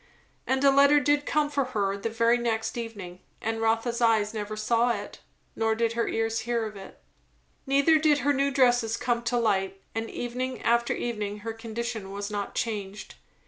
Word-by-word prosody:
And 265 +1 +1
a 275 - +7
letter 280 +2 +6
did 290 +1 +1
come 300 -1 +1
for 280 -1 +1
her 205 -6 -1
the 200 +3 -3
very 230 +1 +2
next 225 -2 -1
evening; 205 -7 -7 0.2
and 225 0 -3
Rotha's 225 +2 0
eyes 220 -2 +3
never 215 0 -4
saw 230 +3 +2
it, 235 - -4 0.4
nor 225 0 +1
did 230 0 0
her 235 0 0
ears 225 0 -1
hear 235 -2 -1
of 215 -1 -7
it. 195 -1 -11 0.7
Neither 280 +4 +4
did 305 -2 +4
her 285 - +4
new 275 +1 +1
dresses 245 -4 +2
come 240 -1 0
to 245 - +1
light; 195 -4 0
and 225 0 -3
evening 250 +1 -4
after 235 0 +2
evening 210 -3 -4
her 225 +1 -4
condition 225 -2 -5
was 200 +1 -5
not 205 -1 -4
changed. 210 -4 -4
230 Hz, 185 wpm, -27 LUFS, 215-245 Hz, 0.7 s, a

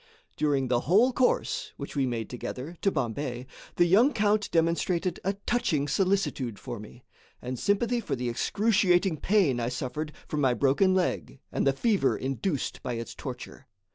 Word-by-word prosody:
During 140 -3 +1
the 120 -1 +2
whole 230 +8 +5
course, 250 0 0
which - - -7
we 135 -2 +1
made 115 -2 -3
together, 125 +6 -6
to 195 - +3
Bombay, 125 - -3 0.3
the 175 - +4
young 225 +11 +5
count 210 -1 +1
demonstrated 170 +2 0
a 195 - 0
touching 160 -12 +1
solicitude 165 - 0
for 120 - -7
me, 115 +4 -12 0.4
and 125 0 -5
sympathy 235 +4 +1
for 230 - -3
the 125 -1 -3
excruciating 190 - +2
pain 175 - +2
I 120 0 -1
suffered 145 +5 -4 0.2
from 150 - -2
my 130 -3 +3
broken 145 +9 +3
leg 180 -6 -1
and - - 0
the - - +6
fever 200 - +1
induced 135 - -2
by 125 - -3
its 115 0 -5
torture. 130 0 -8
150 Hz, 165 wpm, -28 LUFS, 125-195 Hz, 0.4 s, the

